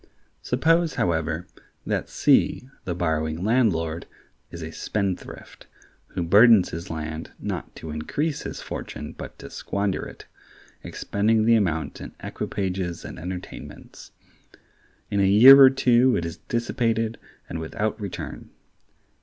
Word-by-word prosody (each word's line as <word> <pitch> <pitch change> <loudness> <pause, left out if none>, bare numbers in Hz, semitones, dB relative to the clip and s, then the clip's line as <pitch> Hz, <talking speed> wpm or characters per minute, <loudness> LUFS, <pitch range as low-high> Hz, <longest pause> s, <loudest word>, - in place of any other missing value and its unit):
Suppose, 165 +6 +2
however, 80 0 -1 0.4
that - - -2
C, 125 - +2 0.2
the 90 - -2
borrowing 80 -1 -1
landlord, 85 -9 +1 0.4
is 85 -1 -8
a 80 - -6
spendthrift, 100 +1 -4 0.5
who 90 - -1
burdens 105 +3 +6
his 85 +3 -7
land 80 0 -5
not - - -5
to 80 - -8
increase 140 - -2
his - - -7
fortune - - -6
but - - -10
to - - -11
squander 100 -1 -2
it, - - -12 0.6
expending 110 +2 0
the 115 - +5
amount 80 -9 0
in - - -8
equipages 95 -3 -4
and - - -8
entertainments. 90 +2 -9 1.0
In 100 - +1
a 100 - +4
year 130 +7 +10
or 135 - +10
two 125 -1 +3
it 85 - -2
is 85 - -6
dissipated, 115 -1 -1 0.3
and 80 - -5
without 105 +7 -3
return. 100 -3 -6
95 Hz, 130 wpm, -24 LUFS, 80-115 Hz, 1.0 s, year